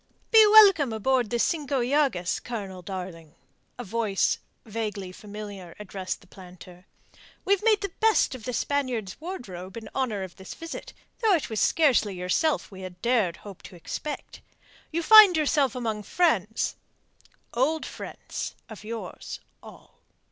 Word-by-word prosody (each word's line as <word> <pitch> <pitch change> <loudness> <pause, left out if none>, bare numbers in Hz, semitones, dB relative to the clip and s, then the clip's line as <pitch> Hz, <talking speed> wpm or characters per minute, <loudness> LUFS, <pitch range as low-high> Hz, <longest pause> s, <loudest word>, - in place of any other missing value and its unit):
"Be 445 -1 +9
welcome 390 - +7
aboard 245 +1 +1
the 240 - 0
Cinco 285 +1 0
Llagas, 250 -8 +1
Colonel, 200 -6 -6
darling," 175 -4 -7 0.4
a 245 - -5
voice 215 -2 0 0.3
vaguely 210 -4 -4
familiar 205 -3 -9
addressed 190 -2 -5
the - - -18
planter. 180 -1 -14 0.6
"We've 400 -1 +3
made 430 -1 +3
the 400 -2 -3
best 445 -8 +3
of 255 -4 -9
the 250 - -2
Spaniards' 250 -9 -1
wardrobe 195 - -7
in 220 -2 -8
honour 230 -7 -1
of 185 -2 -9
this 190 - -9
visit, 330 0 -8 0.3
though 435 -4 +4
it 300 -7 -3
was 215 - -1
scarcely 255 - +3
yourself 180 - 0
we 190 -1 -10
had 180 -1 -9
dared 225 -8 +2
hope 200 -3 -10
to - - -12
expect. 290 - -6 0.5
You 335 +1 -1
find 420 -3 +9
yourself 290 -4 +2
among 225 -4 -2
friends 220 - 0 0.8
old 300 +6 +1
friends - - -7
of 220 -2 -10
yours, 225 +1 -7 0.2
all." - - -15
225 Hz, 145 wpm, -26 LUFS, 190-295 Hz, 0.8 s, Be